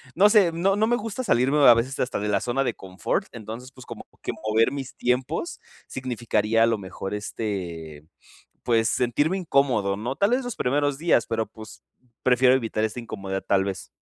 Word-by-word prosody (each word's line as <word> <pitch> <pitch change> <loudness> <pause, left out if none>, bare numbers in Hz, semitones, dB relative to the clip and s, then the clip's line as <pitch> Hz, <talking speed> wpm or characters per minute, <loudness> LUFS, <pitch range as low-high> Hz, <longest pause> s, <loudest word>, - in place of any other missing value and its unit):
no 205 +4 +6
sé, 200 -6 +5
no 190 +4 +1
no 220 +1 +2
me 240 - +3
gusta 230 +2 -4
salirme 135 - +2
a 120 - +10
veces 125 +4 -2
hasta 125 - -1
de 105 +1 -2
la 105 - +2
zona 125 +3 0
de 125 -4 -2
confort. 95 0 -3
Entonces, 115 +3 -8
pues, 130 - -13
como 115 - -10
que - - -3
mover 110 +2 +1
mis 135 -2 -6
tiempos 130 - -1 0.3
significaría 115 -3 0
a - - +6
lo 115 - +1
mejor, 95 0 -6
este, 85 -8 -5 0.6
pues, 115 -2 +2
sentirme 145 +11 +1
incómodo, 130 - +1
¿no? 120 +5 -4
Tal 200 +3 +2
vez 255 +2 +2
los 245 -2 -5
primeros 145 +2 0
días, 165 -7 +2
pero 115 -1 -1
pues, 110 +1 -13 0.4
prefiero 125 0 +4
evitar 115 -4 -1
esta 110 +2 -3
incomodidad, 95 -4 -5
tal 95 -1 +3
vez. 95 -1 -5
120 Hz, 190 wpm, -25 LUFS, 110-140 Hz, 0.6 s, a